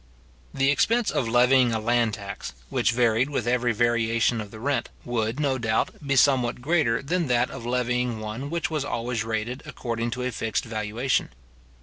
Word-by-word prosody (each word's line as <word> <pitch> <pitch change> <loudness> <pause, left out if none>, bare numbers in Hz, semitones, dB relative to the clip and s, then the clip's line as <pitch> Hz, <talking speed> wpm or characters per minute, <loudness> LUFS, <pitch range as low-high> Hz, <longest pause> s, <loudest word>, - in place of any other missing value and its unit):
The 135 +1 +2
expense 230 +9 +2
of 120 - 0
levying 125 +1 +4
a 110 - 0
land 115 -1 +1
tax, 100 -2 -7 0.2
which - - +2
varied 120 +2 +2
with 135 -6 -2
every 120 0 +2
variation 115 0 +1
of 105 - -8
the 110 - -11
rent, 140 +4 -1 0.2
would, 115 +1 -1
no 135 -3 +1
doubt, 110 -2 0
be 140 -1 0
somewhat 125 -3 +3
greater 135 -4 +1
than 170 +3 0
that 125 0 +2
of 115 - -7
levying 125 -1 0
one 110 +6 -5
which 170 0 -2
was 155 -3 -1
always 120 -4 -2
rated 115 +3 -3
according 115 -1 -3
to 125 - -3
a 125 - -1
fixed 110 -3 -2
valuation. 115 +3 -1
120 Hz, 180 wpm, -25 LUFS, 115-135 Hz, 0.2 s, levying